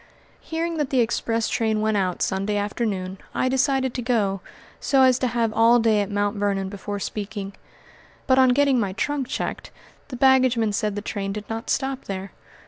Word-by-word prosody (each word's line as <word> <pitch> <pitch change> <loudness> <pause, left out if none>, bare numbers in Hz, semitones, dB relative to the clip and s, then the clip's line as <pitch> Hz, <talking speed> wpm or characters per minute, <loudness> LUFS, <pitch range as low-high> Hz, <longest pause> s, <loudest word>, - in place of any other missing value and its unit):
Hearing 330 +1 -3
that 295 -3 -1
the 265 - +1
express 230 -1 0
train 220 -2 0
went 215 0 +1
out 185 -3 0
Sunday 195 +2 -1
afternoon, 205 -3 -2 0.2
I - - +1
decided 265 0 +1
to 250 - -3
go, 210 -6 0 0.4
so 270 -2 +3
as 255 -1 +4
to 255 - +1
have 230 -2 0
all 230 +2 +5
day 225 -3 +3
at 200 - -3
Mt. 205 +1 -1
Vernon 200 -1 -1
before 205 +1 -5
speaking; 200 -1 -5 0.7
but 260 0 +4
on 260 -1 +6
getting 275 0 +3
my 200 -4 -1
trunk 275 +5 -2
checked, - - -4 0.4
the 255 - -7
baggageman 255 -4 +3
said 210 -1 -1
the 205 - -4
train 195 -3 -3
did 210 0 -7
not 225 +1 -5
stop 270 -1 -1
there. 195 0 -5
225 Hz, 185 wpm, -23 LUFS, 205-255 Hz, 0.7 s, on